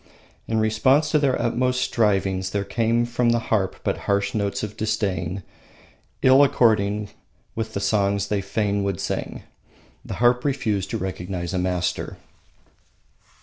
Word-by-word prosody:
In 110 Hz, -1 st, 0 dB
response 130 Hz, +8 st, +3 dB
to 155 Hz, -, +4 dB
their 140 Hz, -3 st, +1 dB
utmost 125 Hz, +2 st, 0 dB
strivings 95 Hz, -5 st, +1 dB
there 100 Hz, +1 st, -1 dB
came 115 Hz, +2 st, +1 dB
from 120 Hz, 0 st, 0 dB
the 120 Hz, -, +3 dB, 0.2 s
harp 95 Hz, -3 st, +1 dB
but -, -, -1 dB
harsh 100 Hz, 0 st, +1 dB
notes 100 Hz, -2 st, -1 dB
of 105 Hz, -1 st, -5 dB
disdain, 95 Hz, -4 st, -2 dB, 0.8 s
ill 130 Hz, +2 st, +7 dB
according 105 Hz, -6 st, +2 dB, 0.4 s
with 110 Hz, -1 st, -4 dB
the -, -, 0 dB
songs 100 Hz, 0 st, +1 dB
they 105 Hz, -1 st, 0 dB
fain 100 Hz, 0 st, -1 dB
would 100 Hz, -3 st, -2 dB
sing. -, -, -4 dB, 0.6 s
The -, -, -6 dB
harp 120 Hz, +1 st, +3 dB
refused 105 Hz, -9 st, -1 dB
to -, -, -2 dB
recognise 90 Hz, -1 st, -4 dB
a 95 Hz, -, 0 dB
master. 90 Hz, -1 st, -2 dB
105 Hz, 145 wpm, -23 LUFS, 100-120 Hz, 0.8 s, ill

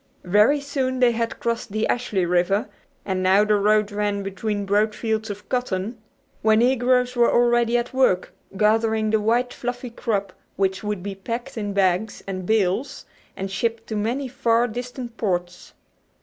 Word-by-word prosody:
Very 210 Hz, +10 st, +4 dB
soon 270 Hz, -2 st, -2 dB
they 250 Hz, -1 st, +5 dB
had 230 Hz, 0 st, -2 dB
crossed 230 Hz, -2 st, -2 dB
the 215 Hz, +2 st, 0 dB
Ashley 215 Hz, -7 st, 0 dB
River, 180 Hz, +4 st, +1 dB, 0.4 s
and 190 Hz, -1 st, -1 dB
now 190 Hz, +2 st, +5 dB
the 210 Hz, 0 st, +2 dB
road 210 Hz, +1 st, +3 dB
ran 205 Hz, -1 st, -1 dB
between 200 Hz, +1 st, -3 dB
broad 210 Hz, +2 st, +1 dB
fields 220 Hz, -1 st, -2 dB
of 205 Hz, 0 st, -7 dB
cotton 230 Hz, -3 st, -2 dB, 0.4 s
where 220 Hz, 0 st, +4 dB
negroes 250 Hz, +1 st, +2 dB
were 240 Hz, -1 st, +4 dB
already 240 Hz, 0 st, +3 dB
at 240 Hz, +1 st, -3 dB
work 255 Hz, -9 st, +2 dB, 0.2 s
gathering 220 Hz, +1 st, +2 dB
the 220 Hz, -1 st, +2 dB
white 240 Hz, +3 st, +1 dB
fluffy 245 Hz, 0 st, -5 dB
crop 205 Hz, -4 st, -2 dB, 0.2 s
which 190 Hz, 0 st, 0 dB
would 210 Hz, -3 st, -3 dB
be 200 Hz, 0 st, -4 dB
packed 235 Hz, +7 st, -5 dB
in 205 Hz, -3 st, -3 dB
bags 195 Hz, +2 st, 0 dB
and 185 Hz, -2 st, -5 dB
bales 220 Hz, +3 st, 0 dB, 0.3 s
and 195 Hz, 0 st, -4 dB
shipped 225 Hz, +3 st, -2 dB
to 220 Hz, -, -3 dB
many 240 Hz, +6 st, -1 dB
far 235 Hz, -2 st, +1 dB
distant 245 Hz, +1 st, -6 dB
ports. 180 Hz, -4 st, -3 dB
220 Hz, 165 wpm, -23 LUFS, 200-240 Hz, 0.4 s, they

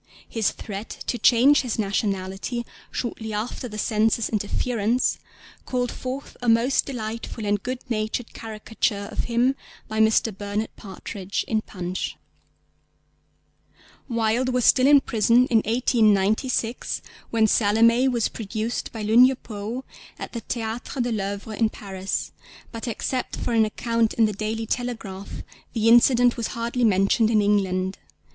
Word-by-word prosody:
His 225 Hz, -3 st, 0 dB
threat 205 Hz, 0 st, -7 dB, 0.2 s
to 240 Hz, -, -2 dB
change 265 Hz, +5 st, +5 dB
his 245 Hz, -4 st, -3 dB
nationality 200 Hz, +2 st, -2 dB, 0.2 s
shortly 220 Hz, -2 st, -4 dB
after 220 Hz, +4 st, -3 dB
the 215 Hz, -2 st, -8 dB
Censor's 220 Hz, +2 st, +1 dB
interference 225 Hz, +2 st, 0 dB, 0.5 s
called 245 Hz, -2 st, -1 dB
forth 260 Hz, +2 st, -6 dB
a 245 Hz, -, +1 dB
most 230 Hz, +4 st, +3 dB
delightful 230 Hz, -3 st, -5 dB
and 205 Hz, 0 st, +1 dB
good 255 Hz, +4 st, -3 dB
natured 220 Hz, 0 st, -2 dB
caricature 215 Hz, -2 st, -3 dB
of -, -, -2 dB
him 245 Hz, +3 st, +2 dB, 0.3 s
by 220 Hz, 0 st, -3 dB
Mr. 220 Hz, -1 st, +3 dB
Bernard 205 Hz, +2 st, -3 dB
Partridge 195 Hz, 0 st, -5 dB
in 220 Hz, -1 st, +1 dB
Punch. 185 Hz, -3 st, -5 dB, 1.9 s
Wilde 230 Hz, +2 st, +1 dB
was 250 Hz, -2 st, +1 dB
still 255 Hz, 0 st, +5 dB
in 285 Hz, -1 st, +7 dB
prison 235 Hz, +1 st, +3 dB
in 225 Hz, -, +6 dB
1896 225 Hz, +1 st, +1 dB, 0.3 s
when 225 Hz, -1 st, +3 dB
Salomé 230 Hz, +4 st, +4 dB
was 235 Hz, -3 st, +1 dB
produced 220 Hz, +2 st, -4 dB
by 220 Hz, -2 st, -6 dB
Lugne 245 Hz, +5 st, +6 dB
Poë 225 Hz, +2 st, -6 dB, 0.3 s
at -, -, -7 dB
the 235 Hz, -, -4 dB
Théàtre 230 Hz, +3 st, -3 dB
de 240 Hz, -, -2 dB
L'Œuvre 205 Hz, 0 st, -3 dB
in 220 Hz, 0 st, +2 dB
Paris, 195 Hz, -2 st, -4 dB, 0.4 s
but 230 Hz, +2 st, -6 dB
except 250 Hz, +3 st, -2 dB
for 240 Hz, -, -3 dB
an 225 Hz, -1 st, +4 dB
account 230 Hz, +1 st, 0 dB
in 225 Hz, -, +4 dB
the 210 Hz, -, 0 dB
Daily 220 Hz, +2 st, -3 dB
Telegraph 220 Hz, -5 st, -4 dB, 0.3 s
the 225 Hz, -2 st, +1 dB
incident 240 Hz, +1 st, +5 dB
was 230 Hz, -, -1 dB
hardly 235 Hz, +2 st, -1 dB
mentioned 210 Hz, +1 st, +3 dB
in 220 Hz, -2 st, +3 dB
England. 190 Hz, -2 st, +1 dB
225 Hz, 140 wpm, -24 LUFS, 210-240 Hz, 1.9 s, in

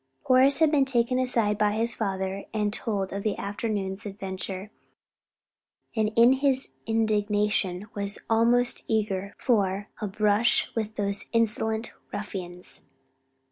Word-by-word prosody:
Horace 260 Hz, +2 st, +5 dB
had 320 Hz, -2 st, +4 dB
been 285 Hz, -3 st, +4 dB
taken 255 Hz, -1 st, +1 dB
aside 230 Hz, -5 st, +1 dB
by 210 Hz, -1 st, +3 dB
his 230 Hz, +2 st, +2 dB
father 195 Hz, -2 st, -3 dB
and 210 Hz, -1 st, 0 dB
told 200 Hz, -5 st, -2 dB
of 200 Hz, -, -3 dB
the 210 Hz, -1 st, -1 dB
afternoon's 200 Hz, -1 st, -3 dB
adventure, 195 Hz, 0 st, -6 dB, 1.2 s
and 215 Hz, -1 st, +1 dB
in 235 Hz, +2 st, +7 dB
his 265 Hz, -1 st, 0 dB
indignation 210 Hz, -3 st, 0 dB
was 200 Hz, 0 st, -1 dB
almost 235 Hz, +2 st, +2 dB
eager 200 Hz, -3 st, -1 dB
for 200 Hz, -4 st, 0 dB
"a 210 Hz, -, -1 dB
brush 210 Hz, +3 st, +2 dB
with 220 Hz, -1 st, -3 dB
the 200 Hz, -1 st, -1 dB
insolent 220 Hz, 0 st, +1 dB, 0.2 s
ruffians." 180 Hz, -8 st, -4 dB
210 Hz, 125 wpm, -26 LUFS, 200-230 Hz, 1.2 s, in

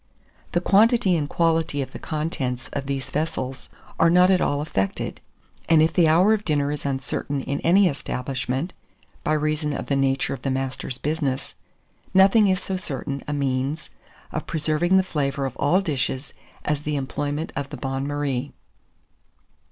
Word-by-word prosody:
The 175 Hz, -, +2 dB
quantity 210 Hz, 0 st, +4 dB
and 150 Hz, -3 st, -1 dB
quality 165 Hz, -3 st, +1 dB
of 135 Hz, -, -3 dB
the -, -, -8 dB
contents 145 Hz, -5 st, -3 dB
of 140 Hz, -1 st, -3 dB
these 135 Hz, -1 st, -3 dB
vessels 135 Hz, -4 st, -3 dB, 0.3 s
are 165 Hz, -, +6 dB
not 180 Hz, +2 st, +6 dB
at 185 Hz, -, +3 dB
all 145 Hz, -, +1 dB
affected; 120 Hz, -11 st, -2 dB, 0.5 s
and 165 Hz, -1 st, +6 dB
if 160 Hz, +1 st, +4 dB
the 170 Hz, -3 st, +4 dB
hour 180 Hz, +7 st, +5 dB
of 210 Hz, -1 st, 0 dB
dinner 145 Hz, -4 st, +1 dB
is 145 Hz, -1 st, -3 dB
uncertain 135 Hz, +1 st, -2 dB
in 140 Hz, +2 st, -3 dB
any 190 Hz, +3 st, +5 dB
establishment, 135 Hz, +1 st, -3 dB, 0.5 s
by 155 Hz, -, +1 dB
reason 155 Hz, 0 st, 0 dB
of -, -, -4 dB
the 140 Hz, -, 0 dB
nature 135 Hz, 0 st, +1 dB
of 135 Hz, -, -7 dB
the 135 Hz, -, -2 dB
master's 130 Hz, -1 st, -3 dB
business, 140 Hz, -2 st, -2 dB, 0.6 s
nothing 195 Hz, +3 st, +6 dB
is 185 Hz, -1 st, +2 dB
so 190 Hz, 0 st, -3 dB
certain 140 Hz, -5 st, -4 dB
a 150 Hz, -, -2 dB
means 140 Hz, +1 st, -1 dB, 0.4 s
of -, -, -4 dB
preserving 160 Hz, +3 st, +2 dB
the 190 Hz, -, +4 dB
flavour 140 Hz, -5 st, -1 dB
of 130 Hz, -, -4 dB
all 175 Hz, +7 st, +3 dB
dishes 135 Hz, -5 st, -2 dB, 0.3 s
as 150 Hz, -1 st, 0 dB
the 150 Hz, 0 st, -2 dB
employment 145 Hz, +4 st, -2 dB
of 140 Hz, -1 st, -3 dB
the 145 Hz, -, -7 dB
bain 135 Hz, +2 st, -3 dB
marie. 140 Hz, -2 st, -2 dB
145 Hz, 165 wpm, -24 LUFS, 135-165 Hz, 0.6 s, are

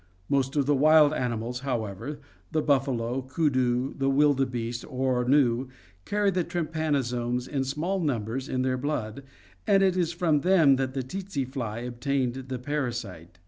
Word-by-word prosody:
Most 135 Hz, 0 st, +1 dB
of 145 Hz, -2 st, +2 dB
the 145 Hz, -, +3 dB
wild 150 Hz, +1 st, +6 dB
animals, 120 Hz, -2 st, -2 dB
however, 125 Hz, +1 st, -4 dB, 0.3 s
the 155 Hz, -1 st, 0 dB
buffalo, 135 Hz, -3 st, +1 dB
koodoo, 130 Hz, -2 st, 0 dB
and -, -, -14 dB, 0.2 s
wildebeeste 125 Hz, -5 st, +1 dB
or 130 Hz, -1 st, 0 dB
gnu, 130 Hz, -2 st, +3 dB, 0.4 s
carry 205 Hz, -1 st, +1 dB
the 180 Hz, -1 st, 0 dB
trypanosomes 135 Hz, -8 st, -1 dB
in 135 Hz, -2 st, -1 dB
small 160 Hz, +9 st, -2 dB
numbers 130 Hz, -, -2 dB
in 130 Hz, 0 st, 0 dB
their 130 Hz, 0 st, 0 dB
blood, 125 Hz, -4 st, -3 dB, 0.5 s
and 195 Hz, -1 st, +5 dB
it 190 Hz, -2 st, +3 dB
is 175 Hz, -3 st, +1 dB
from 170 Hz, -3 st, +1 dB
them 165 Hz, -7 st, +5 dB
that 130 Hz, 0 st, -2 dB
the 135 Hz, -, -1 dB
tsetse 180 Hz, 0 st, -4 dB
fly 120 Hz, -4 st, -4 dB
obtained 125 Hz, +1 st, -1 dB
the 130 Hz, 0 st, -5 dB
parasite. 120 Hz, -, -4 dB
135 Hz, 150 wpm, -27 LUFS, 125-150 Hz, 0.5 s, wild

